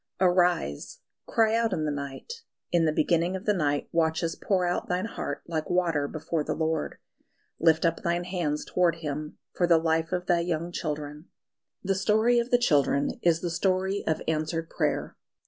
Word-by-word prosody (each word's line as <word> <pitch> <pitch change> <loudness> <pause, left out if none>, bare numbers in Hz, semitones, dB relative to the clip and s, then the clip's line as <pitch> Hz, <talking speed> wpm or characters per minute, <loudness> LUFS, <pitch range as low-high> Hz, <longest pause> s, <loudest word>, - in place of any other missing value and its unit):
"Arise, 175 - +1 0.3
cry 225 -1 +3
out 230 -1 +1
in 155 - -1
the 150 - 0
night; 145 - -6 0.3
in 170 -2 +3
the 155 - +3
beginning 170 +4 +1
of 190 +3 -6
the 210 - +3
night 145 -6 0
watches 165 0 0
pour 185 -3 0
out 175 0 -2
thine 180 +3 0
heart 230 - -5
like 160 -2 -3
water 170 -5 +1
before 155 +1 -3
the - - -2
Lord; 160 -1 -1 0.6
lift 160 0 +4
up 165 0 +1
thine 170 +1 0
hands 175 -5 -2
towards 180 -2 +1
Him 150 0 -5 0.2
for 175 - +1
the 170 -1 +6
life 160 0 0
of 180 -1 -1
thy 175 -1 +3
young 170 0 -2
children!" 150 -1 -5 0.6
The 195 0 +1
story 220 +5 +3
of 235 +1 -2
the 245 - +5
children 145 - +2
is 170 -1 +2
the 175 - -2
story 190 +3 0
of 160 - 0
answered 160 +1 -2
prayer. - - -1
170 Hz, 180 wpm, -27 LUFS, 155-185 Hz, 0.6 s, the